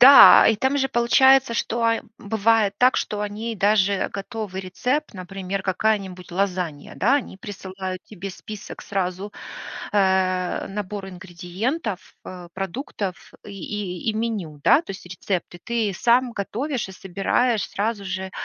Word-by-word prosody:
Да, 275 +2 +10
и 220 - +3
там 265 +6 +1
же 270 -1 +1
получается, 265 +1 +5
что, 230 0 -1 0.3
бывает 215 -1 +2
так, 250 +1 +5
что 210 -1 -2
они 215 +2 -4
даже 200 0 +2
готовый 200 -1 -5
рецепт, 250 +10 -2
например, 190 +1 -5
какая-нибудь 190 -2 -1
лазанья, 180 -5 -2
да. 245 +8 +3
Они 255 -8 -5
присылают 190 -2 -6
тебе 195 -2 -7
список 210 +2 -9
сразу, 190 +1 -3 0.6
э, 190 -2 +2
набор 200 -1 -5
ингредиентов, 190 - -4
э, 180 -2 -9
продуктов 195 - -5
и 205 - -8
и 200 0 -3
и - - -5
меню, 210 -10 -3
да. 315 - +6
То - - -9
есть 190 -2 -8
рецепты. 180 0 -4
Ты 230 -4 0
сам 245 +1 +3
готовишь 240 +5 -3
и - - -9
собираешь 195 +5 0
сразу 210 0 -2
же, 190 0 -4
200 Hz, 135 wpm, -23 LUFS, 185-230 Hz, 0.6 s, Да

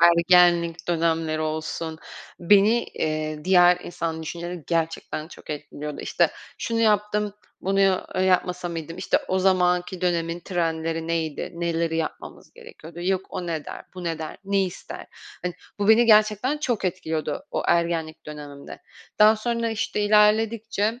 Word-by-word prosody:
ergenlik 170 0 +4
dönemleri 165 -2 0
olsun, 155 +1 -3 0.4
beni, 205 +6 +4
eee, 155 0 -3
diğer 180 -1 +6
insan 165 -2 -4
düşünceleri 170 +1 -6
gerçekten 165 -1 -2
çok - - -12
etkiliyordu. 150 0 -6
İşte, - - +1 0.3
"Şunu 230 -1 -1
yaptım, 210 -1 +1 0.3
bunu 195 +1 +1
ya 195 -1 +2
yapmasa 180 -1 +1
mıydım?" 165 +1 -6
işte, 185 - +1
o 190 - +1
zamanki 180 -1 +2
dönemin 170 -1 -1
trendleri 165 -2 -2
neydi, 160 -3 -2
neleri 170 -1 -1
yapmamız 160 - -6
gerekiyordu, 165 +2 -12
yok 190 +1 0
"O 180 - -5
ne 160 -3 -3
der, - - -8
bu 180 -1 -7
ne 165 -1 -2
der, 155 -1 -6
ne 195 0 +2
ister?" 180 - -8 0.4
hani, 180 -1 -3 0.2
bu 205 +1 0
beni 230 +2 +6
gerçekten 215 +6 +4
çok 240 -9 -1
etkiliyordu 170 - -2
o - - -1
ergenlik 165 -2 0
dönemimde. 145 -2 -9 0.4
Daha 215 +1 +7
sonra, 230 +1 -1
işte, 220 -1 -2
ilerledikçe 215 +1 +2
175 Hz, 140 wpm, -24 LUFS, 165-205 Hz, 0.4 s, Daha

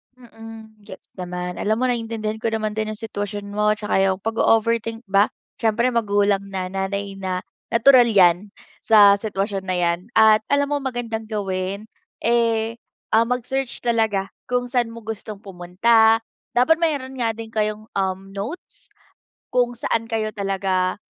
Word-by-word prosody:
Mm, 225 -2 -13
gets - - -12
naman. 180 0 -5
Alam 215 +1 +1
mo - - +3
naiintindihan 225 -2 -3
ko - - 0
naman 215 -1 -2
din 215 0 -2
yung - - -9
sitwasyon 205 -2 -5
mo 210 0 +2
'tsaka 210 -2 -1
yung 190 -1 +2
pag-o-overthink 225 +1 +1
ba. 200 +1 +3 0.3
Siyempre 235 +3 +2
magulang 205 -3 +2
na, 190 -2 -4
nanay 195 +1 -3
na, 185 0 -3 0.3
natural 245 +1 +6
'yan 185 -1 +4 0.3
sa 205 -2 +7
sitwasyon 200 -2 -3
na 185 - 0
'yan. 170 0 +1 0.2
At 215 -1 +6
alam 285 0 +1
mo 290 - +1
magandang 235 -4 -4
gawin, 195 0 -3 0.4
eh, 230 -1 +1 0.3
ah 225 +1 +5
mag-search 250 +1 -2
talaga 220 -5 +1 0.2
kung 245 0 0
sa'n 245 -3 +1
mo 230 -1 -10
gustong 215 -1 -6
pumunta. 210 +5 +3 0.4
Dapat 315 +7 +4
mayroon 280 -5 -1
nga 225 -2 0
din 225 -1 -8
kayong, 215 0 -1
um, 190 -1 -1
notes, 220 - -7 0.6
kung 245 -1 +1
saan 230 -1 -1
kayo 220 -1 -1
talaga 190 -1 -1
220 Hz, 150 wpm, -22 LUFS, 195-230 Hz, 0.6 s, sa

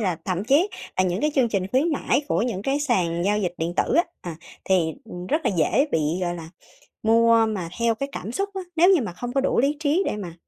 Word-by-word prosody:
là 185 -6 0
thậm 185 +1 -2
chí 290 - +3 0.3
là 185 - +3
những 180 +2 -1
cái 300 - +1
chương 255 -4 +3
trình 195 -3 -1
khuyến 270 - +1
mãi 280 -1 0
của - - +1
những 220 -5 -2
cái 275 +4 0
sàn 180 -11 0
giao 210 +1 +2
dịch 180 -4 -2
điện 165 +2 -2
tử - - +1
á, 340 +3 +4 0.2
à, 170 -3 -7 0.3
thì, 175 -4 +1
ừm, 180 -5 -8
rất 305 - +1
là - - +2
dễ 270 - +2
bị, 160 - +2 0.2
gọi 175 -1 -1
là, 165 -1 -9 0.5
mua 230 0 +5
mà 195 -6 -3
theo 230 -1 +2
cái 275 +5 -4
cảm 215 - -6
xúc 395 +10 -2
á. 385 - -4
Nếu 345 +3 +5
như 370 -6 +5
mà 210 -7 -4
không 245 +7 -6
có 270 - +2
đủ 275 - +1
lý 285 +3 +1
trí 310 +5 +1
để - - -1
mà, 180 -5 -6
225 Hz, 260 wpm, -24 LUFS, 180-280 Hz, 0.5 s, mua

